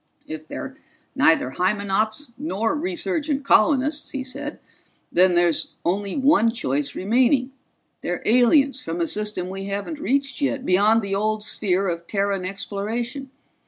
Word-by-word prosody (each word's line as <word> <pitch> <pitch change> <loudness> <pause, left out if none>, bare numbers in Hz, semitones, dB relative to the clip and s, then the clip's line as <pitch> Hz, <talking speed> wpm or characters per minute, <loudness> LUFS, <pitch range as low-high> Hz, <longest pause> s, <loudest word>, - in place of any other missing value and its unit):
"If 155 0 -8
they're 265 - -7 0.4
neither 165 - +3
Hymenops 210 - 0
nor 230 -4 -1
resurgent 320 -3 -2
colonists," 285 +5 +3
he 270 -1 -3
said, 280 +4 -6 0.5
"then 180 0 +4
there's 175 -2 +1
only 195 +5 -1
one 275 -4 +4
choice 145 - -2
remaining 250 +6 +2 0.5
they're 175 - -3
aliens 260 +3 +4
from 165 -3 -4
a 170 - +2
system 210 -1 -2
we 195 +1 -6
haven't 200 +10 -4
reached 275 +1 -1
yet, 280 -1 -1
beyond 210 +4 +4
the 200 0 -3
old 215 +1 0
sphere 195 -2 0
of 170 -1 -3
Terran 200 -2 -1
exploration. 225 +7 -4
215 Hz, 135 wpm, -23 LUFS, 190-270 Hz, 0.5 s, then